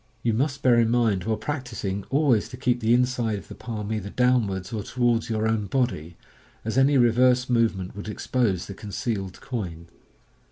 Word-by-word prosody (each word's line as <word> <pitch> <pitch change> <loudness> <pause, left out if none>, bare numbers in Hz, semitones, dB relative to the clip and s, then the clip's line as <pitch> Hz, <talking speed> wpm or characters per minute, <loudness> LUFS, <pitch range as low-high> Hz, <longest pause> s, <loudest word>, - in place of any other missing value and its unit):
You 115 - +2
must 140 +4 -1
bear 120 -2 +5
in 115 -1 +3
mind 115 -6 +1
while 110 -1 0
practising 110 -6 -4
always 135 -6 +2
to 125 - -9
keep 125 -1 +1
the 115 -1 +1
inside 120 -3 +2
of 100 - -11
the - - -7
palm 110 -2 -5
either 105 -2 -3
downwards 110 -6 +1
or 110 - -2
towards 120 +1 0
your 110 -1 0
own 110 -2 0
body, 110 - -1 0.5
as 110 - -2
any 135 +2 +4
reverse 125 +1 +4
movement 110 -7 +1
would 100 +1 -6
expose 105 -4 -1
the 100 - -7
concealed 100 -2 -4
coin. 85 -10 -5
115 Hz, 175 wpm, -25 LUFS, 100-125 Hz, 0.5 s, bear